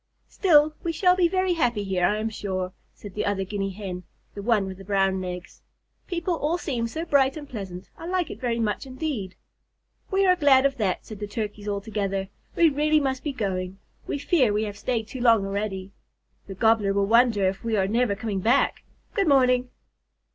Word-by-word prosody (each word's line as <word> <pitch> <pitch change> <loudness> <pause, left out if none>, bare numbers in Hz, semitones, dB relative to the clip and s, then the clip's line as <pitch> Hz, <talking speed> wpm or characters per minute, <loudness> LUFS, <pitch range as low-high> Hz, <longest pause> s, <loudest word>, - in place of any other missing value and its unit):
"Still, 305 -5 +4
we 335 - -1
shall 360 +2 +3
be 360 -2 +4
very 370 +1 +1
happy 240 -10 0
here, 185 -3 +1
I 210 - +1
am 220 +1 -2
sure," 185 -3 -3 0.2
said 205 -3 -11
the 210 - -2
other 200 -1 0
Guinea 195 0 -3
Hen, 190 -2 -6 0.3
the 200 - -6
one 215 -2 +2
with 190 0 -7
the - - -9
brown 195 -1 +1
legs. 180 -1 -7 0.5
"People 350 0 -1
all 315 +4 0
seem 250 -9 -2
so 320 +8 -4
bright 275 -2 +3
and 295 -1 -8
pleasant. 195 -6 -7
I 330 - -7
like 365 -1 -1
it - - -9
very 240 -2 0
much 225 +4 -1
indeed." 255 - -4 0.7
"We 390 0 +2
are 365 -1 +5
glad 275 -5 +5
of 275 -1 +1
that," 195 -6 -1
said 215 -2 -9
the 205 - -4
Turkeys 210 -1 -5
all 200 -1 -1
together. 195 -3 -2 0.3
"We 335 - +5
really 305 +1 +3
must 265 -2 -2
be 295 - -1
going. 190 -6 -3 0.3
We - - -2
fear 280 -5 +2
we 210 +1 0
have 205 -2 -4
stayed 225 +1 -2
too 255 - -7
long 230 -4 +4
already. 195 -1 -3 0.6
The 195 - -7
Gobbler 215 -1 +3
will 200 0 +2
wonder 225 -2 +4
if 190 +1 -3
we 225 -2 0
are 190 -1 +2
never 230 0 +1
coming 210 -2 -3
back. 235 +8 +2 0.3
Good 395 -3 +1
morning." 255 -3 +4
220 Hz, 205 wpm, -25 LUFS, 195-280 Hz, 0.7 s, are